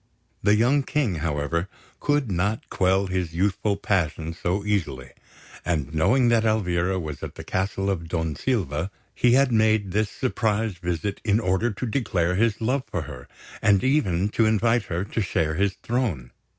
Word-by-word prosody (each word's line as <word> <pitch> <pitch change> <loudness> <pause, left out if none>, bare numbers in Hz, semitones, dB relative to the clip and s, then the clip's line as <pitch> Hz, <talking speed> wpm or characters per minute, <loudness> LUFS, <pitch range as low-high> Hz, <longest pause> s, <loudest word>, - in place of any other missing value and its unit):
The 105 +1 +4
young 125 +6 +3
King, 135 - -1
however, 80 +3 -1 0.3
could 145 -6 +1
not 100 +5 -1
quell 95 +1 +2
his 90 -3 -3
youthful 100 +2 +1
passion 85 -5 -1
so 90 +4 -2
easily; 80 -12 -2 0.5
and, 75 -4 -2
knowing 120 +11 +3
that 115 -1 +3
Elvira 95 -4 +1
was 75 -4 -6
at - - -6
the - - -8
castle 95 +1 -2
of 90 -4 -1
Don 80 -2 -2
Silva, 90 - -1 0.2
he 120 -1 +3
had 135 0 +4
made 110 -3 +2
this 105 +2 +1
surprise 110 -4 -1
visit 90 +3 -3
in 105 -1 +2
order 105 +2 +1
to 115 - -4
declare 95 -8 0
his 110 +3 +1
love 130 +5 0
for 85 - -2
her, 60 -2 -10 0.3
and 100 -2 +4
even 105 - +2
to 110 +1 +2
invite 115 +2 +2
her 85 +2 -2
to 105 +3 -3
share 80 -5 0
his 95 +3 +1
throne. 110 - -1
100 Hz, 165 wpm, -24 LUFS, 85-110 Hz, 0.5 s, The